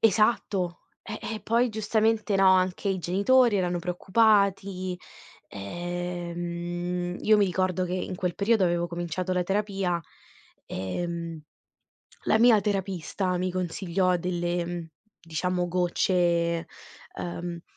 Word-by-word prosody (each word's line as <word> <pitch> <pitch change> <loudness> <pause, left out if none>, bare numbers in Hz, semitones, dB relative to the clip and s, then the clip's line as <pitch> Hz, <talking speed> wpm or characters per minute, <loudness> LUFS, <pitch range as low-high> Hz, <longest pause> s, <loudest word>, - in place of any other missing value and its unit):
Esatto. 200 -4 +2 0.2
Eh, 215 0 -6 0.2
e - - -9
poi 235 +2 +2
giustamente, 220 0 +1
no, 195 -1 +5
anche 185 +1 +2
i 190 -1 0
genitori 205 +6 +3
erano 180 -2 0
preoccupati, 190 0 +2 0.5
ehm, 175 - -4
io 215 0 +5
mi 205 - +4
ricordo 185 0 0
che 180 - -3
in 185 0 -3
quel 180 -2 -2
periodo 205 0 +3
avevo 175 -1 +1
cominciato 175 +1 -3
la 180 0 +1
terapia, 195 -2 0 0.7
ehm, 170 - -4 0.8
la 220 - +3
mia 230 -2 +6
terapista 190 -2 -1
mi 185 +1 -1
consigliò 180 0 0
delle, 175 0 -1
mhmm, 175 -1 -5 0.3
diciamo 175 +2 -1
gocce, 175 -1 +1 0.5
ehm 175 -1 -5
180 Hz, 115 wpm, -27 LUFS, 175-200 Hz, 0.8 s, mia